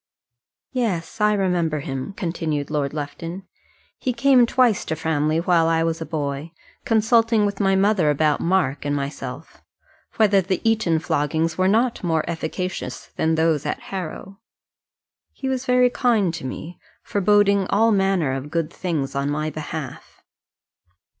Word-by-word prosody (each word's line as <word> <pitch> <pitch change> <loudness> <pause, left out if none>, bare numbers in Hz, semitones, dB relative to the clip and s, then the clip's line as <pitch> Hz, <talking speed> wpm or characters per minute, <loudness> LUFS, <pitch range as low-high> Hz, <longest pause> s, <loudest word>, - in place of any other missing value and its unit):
"Yes: 215 -9 -2
I 210 0 +4
remember 175 -6 0
him," 135 +3 -5
continued 160 -6 -3
Lord 145 -2 -1
Lufton. 165 +5 -6 0.6
"He 255 - -1
came 250 0 +4
twice 240 -5 +3
to 160 - -2
Framley 155 -1 0
while 170 -1 +3
I 165 0 +2
was 165 0 -1
a 160 - -4
boy, 145 +1 -4 0.3
consulting 225 0 +3
with 200 -1 -3
my 195 -2 +3
mother 190 -4 +3
about 150 0 +2
Mark 170 -6 +1
and 145 0 -1
myself, 140 0 -6 0.5
whether 205 -3 +4
the 185 0 -1
Eton 215 -7 +2
floggings 160 +1 0
were 185 0 +2
not 230 +4 +1
more 160 -3 0
efficacious 170 +2 -4
than 160 0 +1
those 160 -2 +2
at - - -3
Harrow. 190 +2 -6 0.9
He 265 - -5
was 265 -1 -2
very 250 0 +4
kind 225 -8 +2
to 165 -5 -6
me, 160 +6 -8 0.2
foreboding 200 -1 +3
all 225 +3 +3
manner 195 -7 +2
of 135 +2 -5
good 165 0 -2
things 160 -7 -2
on 140 +1 -1
my 155 +1 -2
behalf." 155 -3 -7
170 Hz, 145 wpm, -22 LUFS, 155-205 Hz, 0.9 s, I